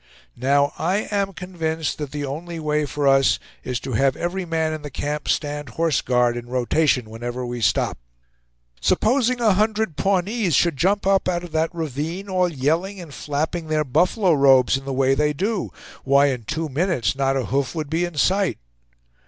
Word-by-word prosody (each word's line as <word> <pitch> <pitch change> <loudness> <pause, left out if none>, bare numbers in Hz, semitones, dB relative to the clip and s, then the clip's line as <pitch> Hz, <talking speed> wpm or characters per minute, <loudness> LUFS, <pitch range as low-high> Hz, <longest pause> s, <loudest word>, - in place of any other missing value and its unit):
Now 140 +3 +2
I 190 +5 0
am 200 -1 0
convinced 165 -5 -3
that 150 -2 -4
the 145 0 -4
only 165 +5 -5
way 150 -1 0
for 145 +1 -1
us 135 -1 +4 0.3
is 125 -2 -2
to 130 - -5
have 135 +4 +2
every 180 +2 -3
man 160 -1 -1
in 155 - -5
the 145 - -7
camp 145 +2 -4
stand 145 -2 -1
horse 165 -3 +2
guard 125 -1 +2
in 120 0 -6
rotation 125 0 +1
whenever 120 +3 -5
we 120 -1 -5
stop. 105 - +1 0.8
Supposing 250 +1 +2
a 220 -4 +4
hundred 215 -4 0
Pawnees 195 - +1
should 170 0 +3
jump 195 +8 +1
up 195 -1 +2
out 175 -1 -1
of 175 - -9
that 160 +1 +1
ravine, 165 +4 -4
all 185 -1 +2
yelling 165 +7 -1
and 165 -5 -10
flapping 155 +5 -3
their 155 -1 +1
buffalo 175 - +2
robes, 135 -3 +5
in 135 0 -5
the 135 - -3
way 135 0 +2
they 150 +2 +1
do? 200 +7 -2 0.3
Why, 140 +1 +4
in 125 -4 -4
two 160 +6 -2
minutes 150 -3 0
not 135 0 +1
a 130 - -1
hoof 140 +3 -1
would 155 -2 -4
be 165 +2 +1
in 175 -2 -4
sight." 190 +6 +2
155 Hz, 185 wpm, -22 LUFS, 135-180 Hz, 0.8 s, robes